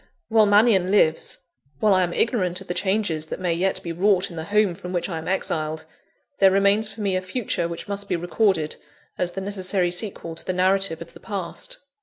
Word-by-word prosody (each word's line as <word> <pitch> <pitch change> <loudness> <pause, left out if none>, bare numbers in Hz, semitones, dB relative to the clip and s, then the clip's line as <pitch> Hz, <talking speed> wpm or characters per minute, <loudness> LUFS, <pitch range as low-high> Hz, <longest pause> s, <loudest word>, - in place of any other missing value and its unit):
While 220 -2 +5
Mannion 205 -3 +4
lives 165 -6 +2 0.4
while 210 -2 +4
I 185 - +4
am 175 -1 0
ignorant 185 -5 0
of 195 - -11
the 175 - -3
changes 190 -4 0
that - - -5
may 180 -2 0
yet 185 +3 0
be 170 - -4
wrought 190 +2 +2
in - - -9
the 160 -1 -5
home 210 -1 +2
from 180 +2 -8
which 175 - -1
I 165 -4 -4
am 160 - -8
exiled 160 -4 -2 0.5
there 195 - +7
remains 200 +3 +3
for 220 - -9
me 195 -2 +1
a 185 - 0
future 185 -3 -2
which 170 0 -7
must 200 0 -4
be 180 - +1
recorded, 175 -2 0 0.4
as 175 -1 -1
the 195 - -4
necessary 190 -2 0
sequel 180 -3 -3
to 165 - -6
the 185 - -2
narrative 185 -2 +1
of 170 - -20
the - - -13
past. 210 - -5
185 Hz, 215 wpm, -23 LUFS, 170-205 Hz, 0.5 s, there